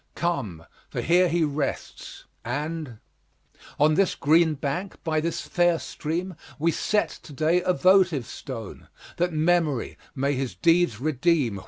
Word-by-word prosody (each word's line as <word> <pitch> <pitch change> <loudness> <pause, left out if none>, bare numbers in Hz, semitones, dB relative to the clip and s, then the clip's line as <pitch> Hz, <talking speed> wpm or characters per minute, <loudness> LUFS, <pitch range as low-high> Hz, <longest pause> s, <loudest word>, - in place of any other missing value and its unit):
Come, 115 - -2 0.2
for - - -4
here 180 +2 +3
he 170 0 +1
rests, 145 -1 -4 0.2
and 145 0 -4 0.8
On 150 +2 +5
this 190 +3 +2
green 160 +1 +3
bank, 150 +8 -3
by 155 -1 0
this 165 +1 -2
fair 175 -1 +2
stream, 170 +4 -4 0.2
We 165 +3 +2
set 210 +5 0
to - - -13
day 155 +5 +2
a 180 - +1
votive 180 -8 +4
stone, 115 -6 -8 0.3
That 175 +1 +1
memory 155 -4 0 0.2
may 140 +1 0
his 130 -7 -3
deeds 165 - +2
redeem? 140 - +1
155 Hz, 140 wpm, -25 LUFS, 140-175 Hz, 0.8 s, On